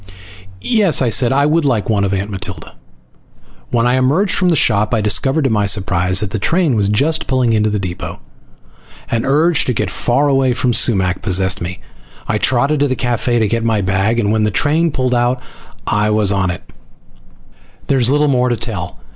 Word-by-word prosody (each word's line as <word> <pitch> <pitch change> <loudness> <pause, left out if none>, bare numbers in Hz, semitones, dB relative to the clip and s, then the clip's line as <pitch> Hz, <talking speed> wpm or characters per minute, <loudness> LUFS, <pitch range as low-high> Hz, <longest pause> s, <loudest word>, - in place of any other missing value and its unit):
"Yes," 210 -8 +2
I 125 - +1
said. 120 +1 +2
"I 140 +2 +2
would 160 +2 +1
like 120 -7 0
one 105 -3 0
of 100 - -1
Aunt 100 +1 -3
Matilda." 95 -1 -7 1.0
When 115 0 0
I 125 - +2
emerged 150 +10 +1
from 180 -2 +1
the 170 - +2
shop 105 -4 +2
I - - 0
discovered 135 +8 +1
to 135 - 0
my 105 -2 +1
surprise 95 -2 +1
that 105 -2 -4
the 110 - -3
train 165 - +1
was 100 -2 0
just 150 +10 0
pulling 130 -3 +1
into 110 0 +1
the 105 - -2
depot. 90 -3 -6 0.9
An 115 -1 -1
urge 155 +4 +2
to 125 - -1
get 105 -3 -2
far 135 +4 +1
away 135 -2 +2
from 120 0 0
Sumac 95 -6 +1
possessed 95 -1 0
me. 90 +1 -6 0.5
I 105 - -1
trotted 140 +6 +1
to 145 - +2
the 130 - -1
cafe 120 -1 -1
to 110 -2 +1
get 115 +1 -2
my 110 -2 0
bag, 95 +5 0
and 105 -2 0
when 110 0 +1
the 105 - +1
train 155 +10 +1
pulled 130 -3 -1
out 120 +1 0 0.5
I 105 0 0
was 105 -2 +1
on 95 -2 0
it. 90 - -6 1.2
There's 130 -3 +1
little 150 +2 +2
more 125 -2 +1
to 120 - -1
tell. 95 -7 -5
115 Hz, 200 wpm, -16 LUFS, 100-135 Hz, 1.2 s, Yes